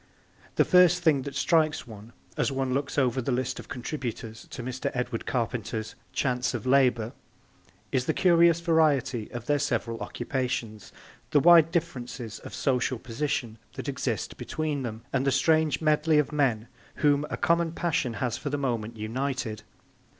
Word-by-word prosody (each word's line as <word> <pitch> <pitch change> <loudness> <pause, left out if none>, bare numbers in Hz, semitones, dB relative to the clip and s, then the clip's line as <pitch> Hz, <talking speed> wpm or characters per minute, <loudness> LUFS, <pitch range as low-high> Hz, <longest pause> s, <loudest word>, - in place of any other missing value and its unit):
The - - +4
first 180 -1 +5
thing 155 -5 +4
that 140 +1 -7
strikes 155 +1 +2
one, 110 0 -12 0.2
as - - 0
one 135 -1 -1
looks 140 +2 -2
over 130 -2 +2
the 130 - -2
list 130 +1 -1
of - - -9
contributors 120 -4 -5
to 125 - -7
Mr. 130 +1 -3
Edward 125 -2 -3
Carpenter's 115 -2 -2 0.2
Chants 125 -2 0
of - - -5
Labour, 125 -4 +3 0.8
is 125 -1 +1
the - - +2
curious 170 -2 +5
variety 145 - +2
of 120 -1 -6
their 145 +1 +2
several 115 -4 -1
occupations, 120 -6 -3 0.4
the 145 - +4
wide 165 +1 +7
differences 125 - -3
of - - -9
social 130 -2 0
position 120 -2 -3
that - - -7
exist - - -3
between 155 -3 -3
them, 115 -2 -5
and 135 -1 +1
the 135 - +2
strange 155 +3 +2
medley 155 0 +3
of 150 0 +2
men 125 -7 +1 0.4
whom 145 0 +4
a - - -3
common 170 -1 +2
passion 160 -8 -1
has 125 -4 -2
for 145 - -4
the 145 - -1
moment 115 -5 -2
united. 115 0 -3
130 Hz, 160 wpm, -27 LUFS, 120-150 Hz, 0.8 s, wide